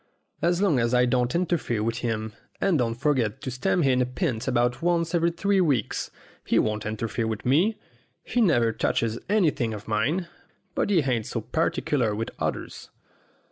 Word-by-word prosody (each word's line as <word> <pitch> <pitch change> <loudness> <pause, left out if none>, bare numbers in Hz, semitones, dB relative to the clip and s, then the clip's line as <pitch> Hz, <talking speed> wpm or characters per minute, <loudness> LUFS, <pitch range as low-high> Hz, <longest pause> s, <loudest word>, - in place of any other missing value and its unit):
As 175 +3 +2
long 160 -10 +3
as 115 +1 +1
I 125 0 +5
don't 125 +1 +1
interfere 165 -11 0
with 115 +1 -1
him, 110 -2 -2 0.3
and 185 -6 +2
don't 115 -2 0
forget 120 -5 0
to 130 - -4
stand 175 +7 +1
him 130 -2 +3
a - - +2
pint 125 - -2
about 125 0 +1
once 170 0 +1
every 170 0 +3
three 195 +3 +1
weeks, 140 - 0 0.3
he - - +1
won't 105 -1 0
interfere 110 +1 -2
with 110 -1 -4
me. 175 - +3 0.5
He 245 - 0
never 120 - +3
touches 115 +1 -1
anything 150 - +1
of 105 +1 -10
mine, 145 - 0 0.5
but - - 0
he 185 -5 +4
ain't 125 -6 -1
so - - -3
particular 120 -8 0
with 115 +2 -3
others. - - -4
125 Hz, 175 wpm, -26 LUFS, 115-170 Hz, 0.5 s, I